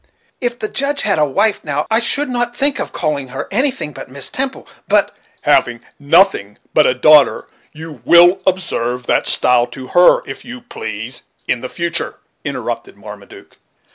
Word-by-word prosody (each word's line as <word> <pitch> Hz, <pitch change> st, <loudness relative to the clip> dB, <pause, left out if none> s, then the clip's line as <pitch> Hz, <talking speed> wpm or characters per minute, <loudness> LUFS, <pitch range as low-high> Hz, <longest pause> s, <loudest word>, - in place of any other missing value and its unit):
If 240 Hz, -1 st, -2 dB
the 215 Hz, -, -3 dB
Judge 280 Hz, +5 st, 0 dB
had 200 Hz, -6 st, +1 dB
a 150 Hz, -, +4 dB
wife 205 Hz, +9 st, 0 dB
now, 145 Hz, 0 st, -2 dB
I 225 Hz, -, +4 dB
shouldn't 240 Hz, -1 st, -1 dB
think 280 Hz, 0 st, +2 dB
of -, -, -2 dB
calling 145 Hz, -3 st, -2 dB
her 135 Hz, +2 st, -6 dB
anything 245 Hz, -, -1 dB
but -, -, -10 dB
Miss 140 Hz, 0 st, -4 dB
Temple; 265 Hz, 0 st, -3 dB, 0.2 s
but -, -, +1 dB
" -, -, -37 dB
"Having 120 Hz, -1 st, +2 dB, 0.2 s
nothing 145 Hz, -, +2 dB, 0.2 s
but 155 Hz, -, +4 dB
a 125 Hz, -, +1 dB
daughter 150 Hz, +3 st, +4 dB, 0.2 s
you 155 Hz, -5 st, -11 dB
will 175 Hz, +2 st, +5 dB
observe 125 Hz, -10 st, -1 dB
that -, -, 0 dB
style 125 Hz, -1 st, +3 dB
to 130 Hz, -1 st, -10 dB
her, 175 Hz, 0 st, +4 dB
if -, -, -8 dB
you 245 Hz, +1 st, -10 dB
please, 115 Hz, -, -7 dB, 0.3 s
in 125 Hz, +1 st, -2 dB
future," 170 Hz, 0 st, -2 dB, 0.3 s
interrupted -, -, -5 dB
Marmaduke. -, -, -13 dB
165 Hz, 165 wpm, -16 LUFS, -, 0.3 s, will